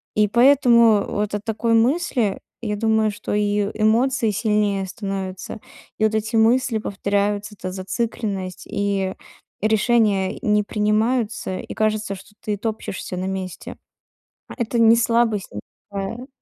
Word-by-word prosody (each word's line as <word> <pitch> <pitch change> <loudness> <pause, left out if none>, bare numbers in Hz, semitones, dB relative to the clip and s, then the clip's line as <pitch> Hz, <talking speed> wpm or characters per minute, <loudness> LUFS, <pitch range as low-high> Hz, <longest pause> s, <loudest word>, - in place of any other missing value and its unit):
И 210 0 +4
поэтому 235 -3 +5
вот 210 0 -2
от 205 - -4
такой 230 +1 0
мысли, 240 - +1 0.2
я 210 -2 -2
думаю, 220 0 +2
что 205 - -5
и, 205 -1 +1
эмоции 230 +1 +2
сильнее 210 -2 0
становятся, 195 -1 -5 0.4
и - - +1
вот 220 - +1
эти 220 +1 -1
мысли 235 +1 +3
повторяются, 205 +1 -1
эта 185 -1 -6
зацикленность, 190 -1 -4
и 200 -2 -1 0.5
решения, 215 -3 +2
э, - - -10
не 210 0 +3
принимаются, 215 0 0
и - - -7
кажется, 215 -1 0
что 195 +2 -15
ты 210 -1 -2
топчешься 210 -4 -4
на 185 - -3
месте. 190 -1 -5 0.7
А - - -9
это 235 -1 -1
не 230 0 +7
слабость 230 -3 +1
никакая. 200 - -7
210 Hz, 135 wpm, -22 LUFS, 200-230 Hz, 0.7 s, не